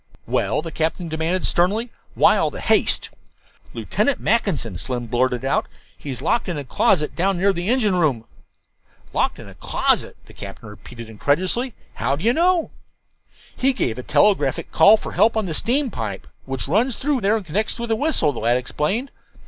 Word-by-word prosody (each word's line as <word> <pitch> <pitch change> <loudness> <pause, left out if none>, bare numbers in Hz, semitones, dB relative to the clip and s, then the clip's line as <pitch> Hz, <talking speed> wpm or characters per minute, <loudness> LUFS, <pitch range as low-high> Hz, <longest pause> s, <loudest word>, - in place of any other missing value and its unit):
"Well?" - - 0
the 165 - -6
captain 165 +2 -2
demanded 160 +4 -1
sternly. 210 +7 +1 0.2
"Why - - +5
all - - +1
the - - -9
haste?" - - +2 0.6
"Lieutenant 285 - -1
Mackinson," 155 - 0
Slim 125 -2 -3
blurted 125 +2 0
out; 135 - 0 0.3
"he's 135 -4 -6
locked 235 - +1
in 170 - -3
a 145 - -4
closet 150 +4 +1
down 190 +2 +1
near 195 +2 +2
the 175 +2 -3
engine 235 -5 +2
room." 140 -10 +1 0.9
"Locked - - 0
in - - -11
a - - -12
closet!" - - 0
the - - -16
captain 110 - -10
repeated 115 +2 -11
incredulously. 180 - -1 0.2
"How - - -1
do 155 - -8
you 235 - +4
know?" 345 +2 +2 0.8
"He 270 +1 +2
gave 125 - -2
a - - -3
telegraphic 145 -2 +1
call 215 +2 +6
for - - -7
help 225 0 +3
on 215 - 0
the 170 - -3
steam 250 - 0
pipe 100 - -5 0.2
which 135 -1 -4
runs 225 - +1
through 280 -2 0
there 210 +3 +2
and 210 - -7
connects 205 +7 -1
with 235 -1 -5
the 225 - +2
whistle," 240 - +1
the - - -6
lad 120 +2 +2
explained. 155 - -2
175 Hz, 180 wpm, -21 LUFS, 135-225 Hz, 0.9 s, call